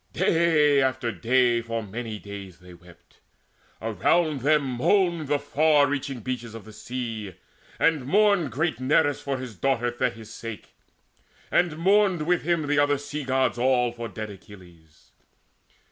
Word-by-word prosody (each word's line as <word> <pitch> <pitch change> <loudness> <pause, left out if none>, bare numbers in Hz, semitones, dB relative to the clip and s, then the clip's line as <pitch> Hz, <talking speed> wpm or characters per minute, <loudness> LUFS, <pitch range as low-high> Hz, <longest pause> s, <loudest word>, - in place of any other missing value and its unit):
Day 155 -4 +3
after 130 -3 0
day, 120 +4 +2
For 115 0 -4
many 110 +2 -6
days 100 -3 -9
they 90 -1 -15
wept. 85 0 -19 0.6
Around 135 - +1
them 150 +2 +3
moaned 160 +5 +1
Far 145 0 +3
stretching 135 -3 -3
beaches 120 -2 -5
of 110 -3 -10
the 110 - -12
sea, 110 -3 -6 0.4
and 150 -5 +1
mourned 200 - +3
Great 160 -2 -1
Nereus 145 +2 +2
for 140 -1 -3
his 130 -4 -8
daughter 120 +1 0
Thetis' 115 -3 -3
sake; 115 -2 -8 0.8
And 175 -3 +2
mourned 190 -1 +3
with 175 +1 +2
him 170 -1 0
the 145 0 +1
other 145 0 +3
Sea 145 +1 -6
gods 130 -2 0
all 125 -1 +2
For 120 0 -6
dead 110 -2 -7
Achilles. 90 -5 -17
130 Hz, 145 wpm, -25 LUFS, 115-150 Hz, 0.8 s, Day